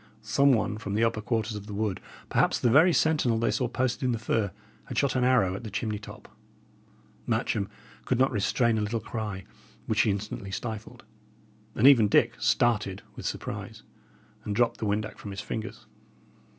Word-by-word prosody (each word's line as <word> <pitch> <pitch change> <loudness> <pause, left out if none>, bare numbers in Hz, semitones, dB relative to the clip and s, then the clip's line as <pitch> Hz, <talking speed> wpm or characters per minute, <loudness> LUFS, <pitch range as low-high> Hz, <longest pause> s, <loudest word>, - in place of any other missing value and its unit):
Some 140 0 +4
one 110 -3 0
from 100 -2 -4
the 110 - +2
upper 115 -1 +1
quarters 110 0 -1
of 105 -1 -7
the 105 - -6
wood, 105 -2 -2 0.3
perhaps - - +2
the 120 - +2
very 160 +8 +6
sentinel 150 -8 +2
they 115 - +1
saw 125 - 0
posted 125 0 -1
in 125 -2 +1
the - - -1
fir, 110 -2 0 0.4
had - - -7
shot 140 -2 +2
an 130 - +2
arrow 125 -8 +3
at 100 - -6
the 110 - -6
chimney 105 +1 -3
top. 105 - -11 1.0
Matcham 100 -2 0 0.4
could 125 - +1
not 130 +2 +3
restrain 115 +1 +1
a - - -1
little 110 +2 -1
cry, 105 -3 -5 0.4
which - - +2
he - - +2
instantly 100 0 -3
stifled, 110 +2 -6 0.7
and 110 - +2
even 125 -6 +8
Dick 115 +3 +3
started 110 -4 +1
with - - -5
surprise, - - -6 0.6
and 105 - -3
dropped 120 +1 +2
the 110 - -2
windac 105 +1 -2
from 105 - -8
his 100 0 -5
fingers. 110 0 -6
110 Hz, 185 wpm, -27 LUFS, 105-120 Hz, 1.0 s, even